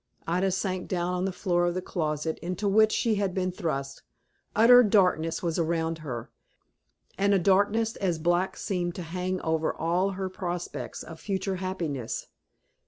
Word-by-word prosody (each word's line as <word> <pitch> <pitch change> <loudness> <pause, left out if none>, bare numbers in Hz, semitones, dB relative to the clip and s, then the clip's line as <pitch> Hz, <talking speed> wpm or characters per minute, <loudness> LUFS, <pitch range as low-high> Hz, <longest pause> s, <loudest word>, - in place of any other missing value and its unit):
Ida 180 +3 +1
sank 185 -1 -2
down 180 0 -1
on 180 +1 -1
the 195 - 0
floor 175 -2 +1
of 175 - -1
the 185 - -1
closet 155 -2 -2
into 185 +4 -3
which 215 +2 +5
she 230 -1 +1
had 190 -3 -1
been 185 -1 0
thrust. 140 -7 -3 0.5
Utter 240 +3 +8
darkness 180 -7 +2
was 170 -1 0
around 165 0 0
her, 125 -7 -6 0.9
and 200 0 +4
a - - +5
darkness 205 +4 +2
as 180 -4 0
black 175 +3 +1
seemed 175 -3 -2
to 180 - -5
hang 180 +2 -3
over 160 0 0
all 180 +4 0
her 190 -1 -2
prospects 175 -2 -5
of 165 -1 -10
future 190 -1 -2
happiness. 170 -10 -3
180 Hz, 165 wpm, -27 LUFS, 165-195 Hz, 0.9 s, Utter